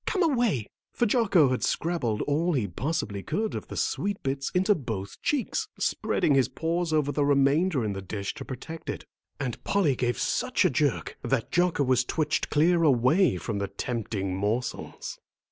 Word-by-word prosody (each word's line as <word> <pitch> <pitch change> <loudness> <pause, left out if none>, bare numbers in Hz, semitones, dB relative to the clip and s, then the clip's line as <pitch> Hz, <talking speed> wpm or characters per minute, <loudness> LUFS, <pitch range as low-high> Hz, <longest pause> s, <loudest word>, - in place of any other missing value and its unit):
Come 380 -4 +2
away," 240 - +1 0.3
for 240 - +1
Jocko 200 - +4
had 130 - -1
scrabbled 145 -11 0
all 165 +5 +1
he 125 -8 +1
possibly 100 - -3
could 210 - -2
of - - -5
the - - -7
sweet 200 0 -1
bits 135 0 -1
into 190 +3 +4
both 110 - -5
cheeks, 300 - -1
spreading 150 - +1
his 135 -2 +4
paws 165 +1 -1
over 150 -2 +2
the 145 - +1
remainder 140 +1 +3
in 105 - -1
the 95 - -5
dish 100 +1 -4
to 145 - -7
protect 160 +6 -8
it. - - -5 0.3
And 130 -5 -4
Polly 180 -10 +2
gave 120 -2 0
such - - +1
a - - +4
jerk - - 0
that - - -1
Jocko 175 -4 +2
was 130 -1 +3
twitched 155 +4 -1
clear 165 +3 +3
away 140 - +4
from 100 +3 -3
the 100 - -1
tempting 100 -2 -3
morsels. 105 +6 -3
140 Hz, 175 wpm, -27 LUFS, 120-175 Hz, 0.3 s, Jocko